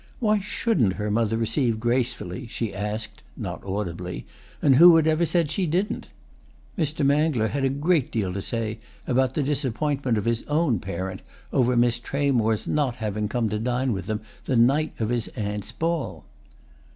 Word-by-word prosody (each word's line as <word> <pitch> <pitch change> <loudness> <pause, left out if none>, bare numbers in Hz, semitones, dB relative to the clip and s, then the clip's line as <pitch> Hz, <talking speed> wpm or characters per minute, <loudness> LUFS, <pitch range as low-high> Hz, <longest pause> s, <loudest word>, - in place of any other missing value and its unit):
Why 215 -3 +3
shouldn't 195 - +1
her 105 +1 -3
mother 115 0 +1
receive 115 0 0
gracefully, 120 -2 -1
she 115 -3 -3
asked 105 +2 -4 0.2
(not - - -5
audibly) 90 -3 -4 0.3
and 135 -3 +4
who 170 +2 +9
had 160 -1 +4
ever 160 +1 +2
said 165 -1 +1
she 180 +3 0
didn't? 185 +7 -1 0.7
Mr. 155 -4 0
Mangler 140 -6 +2
had 140 -1 -2
a 135 - +3
great 145 +1 +1
deal 100 -5 -1
to 100 - -3
say 115 +1 -3 0.3
about 130 0 +1
the 150 - +1
disappointment 135 -2 0
of 105 - -2
his 115 0 +1
own 150 - +2
parent 95 +1 -5 0.3
over 125 -1 +3
Miss 120 0 +3
Tramore's 120 -5 0
not 140 -5 +1
having 105 -2 -2
come 120 -3 0
to 105 +1 -2
dine 125 +2 0
with 95 -2 -5
them 110 0 -2 0.2
the 130 - 0
night 140 +7 +3
of 110 -1 0
his 120 -2 0
aunt's 105 -3 -3
ball. 165 0 -2
120 Hz, 170 wpm, -25 LUFS, 110-145 Hz, 0.7 s, who